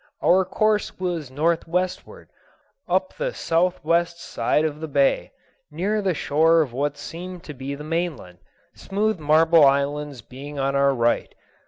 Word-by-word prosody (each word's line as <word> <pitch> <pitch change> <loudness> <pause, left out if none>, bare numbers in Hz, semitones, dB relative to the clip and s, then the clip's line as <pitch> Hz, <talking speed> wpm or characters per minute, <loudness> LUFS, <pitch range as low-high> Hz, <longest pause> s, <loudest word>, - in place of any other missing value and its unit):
Our 185 +1 +4
course 215 +2 0
was 175 -6 -3
northwestward, 170 +5 -2 0.6
up - - +1
the - - -3
southwest 170 0 0
side 150 0 0
of 150 -1 -3
the 160 - -5
bay, 140 -2 +1 0.4
near 195 +8 -1
the 190 -4 0
shore 160 +3 +3
of 130 -5 -9
what 145 +3 -2
seemed 180 +1 -8
to 150 - -8
be 135 +1 -6
the 150 - -9
mainland, 155 - -3 0.3
smooth 210 0 -1
marble 160 +2 +5
islands 140 -2 +1
being 140 +5 -9
on 135 0 0
our 140 0 +3
right. 120 -1 0
160 Hz, 145 wpm, -23 LUFS, 140-175 Hz, 0.6 s, marble